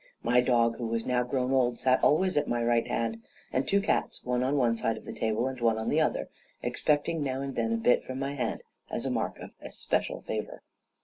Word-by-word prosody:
My 125 +1 +4
dog, 120 -2 +2
who 120 - -3
was 115 0 -1
now 125 -1 +2
grown 125 +1 -1
old, 125 -2 +2
sat 130 0 +2
always 185 +5 +3
at 145 0 +2
my 120 0 0
right 120 0 +2
hand; 115 -1 -2 0.3
and 130 - 0
two 200 - +3
cats, 200 - -1
one 125 0 0
on 135 +3 +1
one 120 -4 +3
side 115 -1 -1
of - - -11
the - - -6
table 110 +2 0
and 130 -2 -5
one 115 -2 +3
on 110 - -2
the - - +3
other, - - 0 0.4
expecting 150 +2 +1
now 135 -2 -1
and 140 -1 -4
then 115 -1 0
a 115 - +1
bit 115 +2 +3
from 130 - -6
my 135 +1 -2
hand, 140 - -3 0.3
as - - -3
a - - 0
mark - - -1
of - - -9
especial - - -2
favor. - - -5
125 Hz, 235 wpm, -29 LUFS, 115-135 Hz, 0.4 s, My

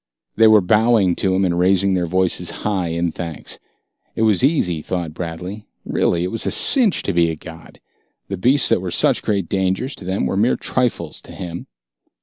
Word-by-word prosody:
They 110 0 +5
were 110 -1 +6
bowing 105 -1 +3
to 95 -1 0
him 95 +1 +2
and 85 -1 0
raising 95 +1 +2
their 90 -2 0
voices 90 0 0 0.2
high 95 -4 0
in 85 +1 -1
thanks. 80 -2 -6 0.6
It 110 - 0
was 110 0 +3
easy, 95 - +1
thought 85 -2 -4
Bradley. 90 +5 -7 0.2
Really, 85 0 0
it 90 - -3
was 115 - -1
a - - +2
cinch 240 -9 +3
to 100 - -2
be 85 -1 +3
a 80 - -3
god. 80 +1 -13 0.5
The 100 - -4
beasts 125 +8 +3
that - - +2
were 95 - -4
such - - +2
great 100 -5 -1
dangers 95 - -1
to 95 - -10
them 95 +2 -1
were - - -2
mere 110 +6 +2
trifles 125 -2 -2
to - - -13
him. 85 -2 -7
95 Hz, 195 wpm, -19 LUFS, 85-105 Hz, 0.6 s, were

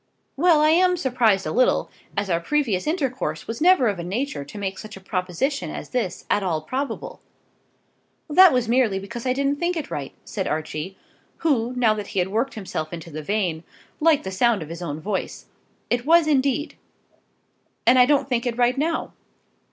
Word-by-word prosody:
"Well; 320 +1 +4
I 305 0 +5
am 360 +2 +4
surprised 235 - +2
a - - -2
little, 255 - +2 0.3
as 200 0 0
our 170 -3 +1
previous 230 - 0
intercourse 275 -6 -2
was 225 +4 -6
never 350 -7 +5
of 200 -4 -1
a - - -4
nature 195 - -3
to 140 +9 -11
make 195 -1 -4
such 215 -2 -9
a - - -10
proposition 190 - -2
as - - -7
this 235 -9 -2
at 205 - +2
all 170 -5 -1
probable." 280 - -4 1.1
"That 365 +4 +7
was 250 -2 +1
merely 235 -4 +2
because 215 +6 -6
I 255 - +2
didn't 280 +2 0
think 345 +2 -1
it 310 - -5
right," 140 -2 -5
said 190 -3 -3
Archie, 155 +4 -4 0.5
who, 250 -5 +1
now 235 -3 +3
that 210 -2 -5
he - - -7
had 180 0 +1
worked 230 +7 -1
himself 175 -7 -5
into 170 -1 -8
the 155 +1 -5
vein, 175 -2 -1 0.4
liked 315 -2 +3
the 190 - -5
sound 210 -1 +2
of 155 - -11
his 170 +1 -7
own 155 -3 -4
voice. 195 +4 -4 0.5
"It 240 0 +1
was 330 +3 +5
indeed." 285 0 0 1.1
"And 255 +2 +6
I 250 - +7
don't 285 -2 +2
think 245 -2 -1
it 235 -1 -2
right 245 +2 +2
now. 325 +2 -1
235 Hz, 190 wpm, -23 LUFS, 190-280 Hz, 1.1 s, That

